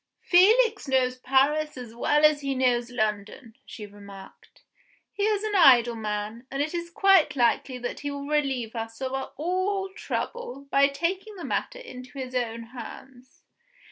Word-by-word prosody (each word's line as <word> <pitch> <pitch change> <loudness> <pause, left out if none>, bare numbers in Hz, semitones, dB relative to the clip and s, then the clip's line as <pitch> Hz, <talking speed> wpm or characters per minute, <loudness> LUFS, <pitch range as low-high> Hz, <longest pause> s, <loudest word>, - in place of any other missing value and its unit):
"Felix 425 +2 +4
knows 255 -1 +1
Paris 280 +4 +1
as 245 -3 -8
well 295 +5 +2
as 300 -1 +4
he 275 -1 -2
knows 245 -2 +1
London," 220 0 -3
she 215 - -8
remarked. 200 -1 -14 0.5
"He - - -6
is 425 -1 0
an 430 -1 -2
idle 245 -9 +6
man, 215 +2 -5
and 275 - -5
it 300 +3 -1
is 340 0 -4
quite 340 -4 +4
likely 250 +1 +1
that 245 0 -5
he 290 - -4
will 280 0 -6
relieve 270 -6 -1
us 225 0 -6
of 260 0 -3 0.2
all 370 +4 -1
trouble 280 - -5
by 275 0 +5
taking 370 +9 -3
the 360 - -7
matter - - -3
into 255 - -11
his 255 -1 -6
own 230 -2 -2
hands. 255 +1 -11
270 Hz, 160 wpm, -26 LUFS, 240-335 Hz, 0.5 s, idle